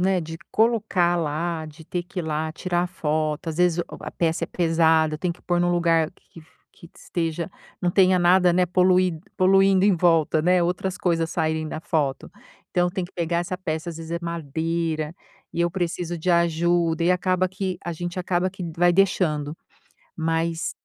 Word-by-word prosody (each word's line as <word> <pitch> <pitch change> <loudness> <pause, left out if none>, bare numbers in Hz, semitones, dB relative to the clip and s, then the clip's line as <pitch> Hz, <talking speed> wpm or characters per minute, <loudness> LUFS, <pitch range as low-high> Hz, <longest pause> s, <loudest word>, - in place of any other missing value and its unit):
né, 185 0 +2
de 165 0 -7
colocar 215 -6 +2
lá, 160 +1 -2
de 155 +1 -13
ter 175 +2 -3
que 180 +2 -9
ir - - -1
lá, 155 0 -2
tirar 175 +1 -1
foto, 155 -1 -2
às 160 - -4
vezes 180 -1 +2
o 175 - 0 0.2
a - - -6
peça 165 -1 0
é - - -9
pesada, 160 -2 +2
tem 180 0 -1
que 170 - -19
pôr 175 -1 0
num 175 - +2
lugar 165 -2 +2
que 165 - -17
f 155 - -24
que 170 - -16
esteja 165 0 -3 0.3
não 175 - +2
tenha 185 0 +4
nada, 180 0 +5
né, 180 +1 +3
polui 180 -1 +2 0.2
poluindo 195 0 +4
em 200 -3 +4
volta, 165 -2 +3
né, 180 +1 +3
outras 180 +2 -1
coisas 165 -4 0
saírem 155 0 -1
da 155 - -5
foto. 145 -5 -1 0.4
Então 180 0 +2
tem 180 0 -3
que - - -11
pegar 170 0 -1
essa 175 +1 -3
peça, 165 -2 -3
às 165 - -8
vezes 165 0 -7
é 170 - -1
madeira 165 0 -2 0.4
e 170 - -3
eu 170 - +3
preciso 175 -1 -2
de 180 +3 0
ajuda, 170 0 +2
e 175 - +3
acaba 185 0 +1
que 190 -1 -4
a 170 - -3
gente 175 +2 -5
acaba 180 +1 0
que 190 0 -9
vai 175 +1 +4
deixando. 165 -5 +1 0.6
Mas 165 +1 -1
170 Hz, 190 wpm, -24 LUFS, 160-180 Hz, 0.6 s, nada